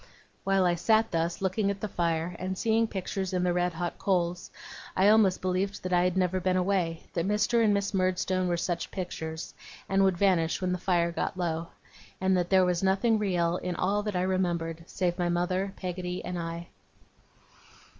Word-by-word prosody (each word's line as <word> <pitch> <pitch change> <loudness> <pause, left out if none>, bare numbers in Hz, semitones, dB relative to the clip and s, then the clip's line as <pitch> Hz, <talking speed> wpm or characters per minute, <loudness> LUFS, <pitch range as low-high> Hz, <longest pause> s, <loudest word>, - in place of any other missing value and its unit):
While 195 -1 +2
I 175 - +3
sat 220 +6 +2
thus, 170 +2 -1
looking 195 +2 +1
at 200 0 -2
the 215 - -3
fire, 170 -2 -1
and 185 +1 -3
seeing 225 +1 +2
pictures 190 -1 -4
in 180 -1 +1
the 180 -1 +2
red 180 0 0
hot 175 +1 -4
coals, 180 -2 0 0.5
I 190 +2 +5
almost 210 -4 +4
believed 185 +2 -1
that 185 0 -2
I 175 0 +4
had 180 0 0
never 185 0 +1
been 185 0 +1
away; 180 -3 0
that 170 +1 -1
Mr. 230 +3 +2
and 215 - +4
Miss 200 0 0
Murdstone 185 0 +1
were 175 -1 0
such 170 0 -2
pictures, 160 -4 -5 0.3
and 195 0 +3
would 190 -2 +2
vanish 175 -4 +2
when 185 -1 -1
the 180 - -1
fire 170 -2 +1
got 170 - -3
low; 165 -2 -2 0.5
and 190 0 +2
that 175 -1 0
there 190 -1 +5
was 180 -1 0
nothing 200 +4 +2
real 175 -4 +1
in 180 -1 -4
all 200 +4 +1
that 210 -2 -4
I 180 - +1
remembered, 170 -3 -1
save 175 -2 -1
my 175 -1 +1
mother, 185 +3 0
Peggotty, 180 -1 -4
and 180 -1 -3
I. 170 0 -5
185 Hz, 195 wpm, -28 LUFS, 175-195 Hz, 0.5 s, I